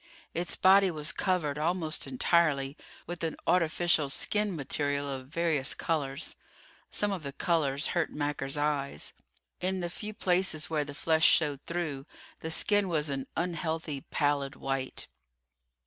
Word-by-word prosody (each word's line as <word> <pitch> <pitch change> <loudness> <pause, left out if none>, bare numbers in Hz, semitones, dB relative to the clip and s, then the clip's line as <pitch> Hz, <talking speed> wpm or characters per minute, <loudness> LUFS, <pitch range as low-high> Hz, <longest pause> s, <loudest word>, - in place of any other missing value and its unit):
Its 175 +1 0
body 195 +1 +6
was 155 -3 0
covered, 160 -7 0
almost 160 -2 -1
entirely, 140 0 +2 0.3
with 175 -1 -5
an 160 -2 -1
artificial 170 -3 +2
skin 210 +6 0
material 145 -1 -1
of 130 -2 -5
various 155 -3 +1
colors. 140 -5 -1 0.5
Some 205 0 +2
of 190 -3 -3
the 140 -2 -5
colors 145 -3 +1
hurt 175 -3 0
Macker's 145 -1 -2
eyes. 145 - -1 0.5
In 185 +1 -1
the 175 -1 -3
few 210 +3 -6
places 180 -5 +1
where 155 -2 +2
the 145 0 -8
flesh 160 +1 +3
showed 145 -4 +4
through 160 -6 -3 0.3
the 160 - -4
skin 205 +4 +2
was 155 -3 +1
an 135 -1 -3
unhealthy, 165 -4 -2
pallid 145 -2 0
white. 135 -1 -3
155 Hz, 140 wpm, -30 LUFS, 140-175 Hz, 0.5 s, body